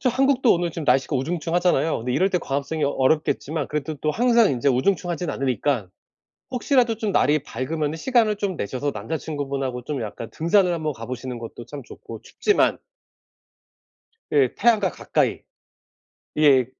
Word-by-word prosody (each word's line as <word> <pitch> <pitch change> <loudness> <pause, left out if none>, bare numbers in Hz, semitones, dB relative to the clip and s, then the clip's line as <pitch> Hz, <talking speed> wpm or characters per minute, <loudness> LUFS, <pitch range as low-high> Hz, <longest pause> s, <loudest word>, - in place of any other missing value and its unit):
저 255 - +2
한국도 265 0 +3
오늘 175 0 -1
지금 165 -1 -5
날씨가 135 +2 +2
우중충하잖아요. 165 +1 0
근데 125 +2 -3
이럴 190 +9 +2
때 180 - +1
광합성이 145 +1 -2
어 140 - +1
어렵겠지만 150 +1 0
그래도 150 +1 -3
또 150 +2 -1
항상 235 +4 +4
인제 130 +1 +1
우중충하진 175 +5 0
않으니까, 130 -4 -1 0.6
혹시라도 250 -2 +2
좀 215 -1 -2
날이 150 -4 +3
밝으면은 150 +4 -3
시간을 225 +1 +2
좀 200 -2 -2
내셔서 130 +7 -2
남자친구분하고 135 +1 -4
좀 140 0 -4
약간 110 +1 -7
등산을 180 +2 +2
한번 155 -3 -2
가보시는 125 +1 -6
것도 115 +1 -9
참 145 -1 -8
좋고 - - -11
춥지만 420 - +1 1.5
그 140 -4 +3
태양과 220 -5 +3
가까이 - - -1 0.9
예. 140 -5 +5
155 Hz, 370 characters per minute, -23 LUFS, 130-185 Hz, 1.5 s, 예